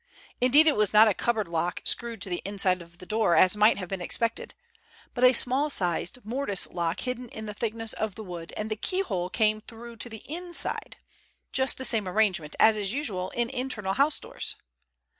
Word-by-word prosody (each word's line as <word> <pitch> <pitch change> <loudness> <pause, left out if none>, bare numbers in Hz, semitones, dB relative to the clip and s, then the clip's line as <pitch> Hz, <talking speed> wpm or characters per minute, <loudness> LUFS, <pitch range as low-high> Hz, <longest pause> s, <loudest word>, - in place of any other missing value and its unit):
Indeed, 270 +5 +6
it 310 - +4
was 210 -1 +2
not 215 +1 +8
a 210 - +3
cupboard 220 -3 -1
lock 170 +1 -2
screwed 230 -4 0
to - - -2
the 175 - -2
inside 195 -2 +1
of 170 0 -15
the 180 - -11
door 215 -4 +2
as 185 +2 +5
might 210 +2 +5
have 185 -2 -5
been 195 -2 -4
expected, 230 +5 -2 0.6
but 245 - -2
a 250 - +8
small 260 +4 +2
sized 180 - -1
mortice 230 -4 -2
lock 170 -1 -3
hidden 250 -1 -4
in 220 0 -8
the 210 - -5
thickness 225 +1 -2
of 215 -3 -3
the 220 - -7
wood, 175 -4 -8
and 215 +1 -4
the - - 0
keyhole 210 - -2
came 215 +1 +1
through 235 +1 -11
to 240 - -2
the 220 -2 -10
inside; 345 +3 -2 0.5
just 265 0 +2
the 260 - -1
same 220 -6 0
arrangement 185 -6 0
as 220 -1 +5
is 200 -1 0
usual 210 -9 -2
in 235 0 -2
internal 220 -7 -2
house 280 +5 +3
doors. - - -6
215 Hz, 200 wpm, -27 LUFS, 190-245 Hz, 0.6 s, not